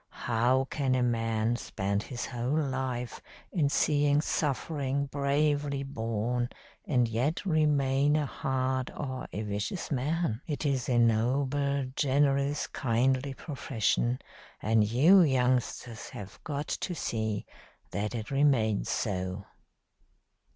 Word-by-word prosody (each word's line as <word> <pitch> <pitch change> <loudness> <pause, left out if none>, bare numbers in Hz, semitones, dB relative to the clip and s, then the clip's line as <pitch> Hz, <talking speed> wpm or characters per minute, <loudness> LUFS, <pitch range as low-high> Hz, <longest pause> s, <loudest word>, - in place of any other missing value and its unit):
How 120 +3 +2
can 135 -3 +1
a 125 - +2
man 115 -1 +1
spend 100 -3 -2
his 120 +2 -5
whole 125 +4 -1
life 130 -4 -2 0.3
in 150 -6 +2
seeing 145 0 +3
suffering 140 -2 -1
bravely 140 0 0
borne 120 -1 -2 0.4
and 125 -5 +2
yet 125 - -1
remain 145 -4 +3
a 150 -1 +1
hard 130 -1 -1
or 130 -3 -4
a 105 +4 -3
vicious 105 - -3
man? 140 -2 0
It 150 -1 -3
is 135 -3 0
a 120 - +3
noble, 135 +5 +2
generous, 140 0 +2
kindly 130 +2 0
profession, 120 -3 -1 0.4
and 110 0 +3
you 145 - +6
youngsters 125 -5 0
have 100 -1 -9
got 145 0 -3
to 180 - -2
see 110 -7 -2 0.5
that 105 +3 -2
it 110 +1 -5
remains 135 -7 +2
so." 95 -1 -2
130 Hz, 115 wpm, -29 LUFS, 115-145 Hz, 0.5 s, you